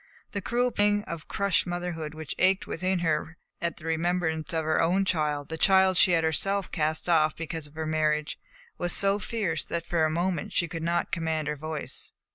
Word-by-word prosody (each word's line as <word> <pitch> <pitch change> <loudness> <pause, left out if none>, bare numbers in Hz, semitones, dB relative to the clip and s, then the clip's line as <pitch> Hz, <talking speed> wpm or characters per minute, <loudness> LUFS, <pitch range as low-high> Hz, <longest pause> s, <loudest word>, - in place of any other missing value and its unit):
The 200 - -3
cruel 245 +5 +1
pang 205 -1 +2
of 170 -5 -7
crushed 200 -2 +1
motherhood 175 -3 -4
which 155 -2 -5
ached 190 +1 +3
within 185 +3 -1
her 160 +1 -1 0.2
at 170 -2 -2
the 155 - -12
remembrance 165 0 0
of 160 -2 -1
her 155 0 +2
own 185 +4 +2
child, 150 -5 -1
the 160 0 -5
child 190 0 +5
she 180 - +6
had 165 -1 +3
herself 195 +5 0
cast 155 0 -1
off 155 -3 +3
because 165 -2 -5
of 145 - -19
her 160 0 -3
marriage, 155 -1 0 0.4
was 175 0 0
so 200 +1 +3
fierce 200 -8 -2
that 170 0 -3
for 170 -2 +1
a 155 - +3
moment 170 0 -1
she 170 - +2
could 165 +1 -5
not 170 +1 0
command 160 -2 -1
her 150 - -1
voice. 155 0 -3
165 Hz, 200 wpm, -27 LUFS, 155-185 Hz, 0.4 s, she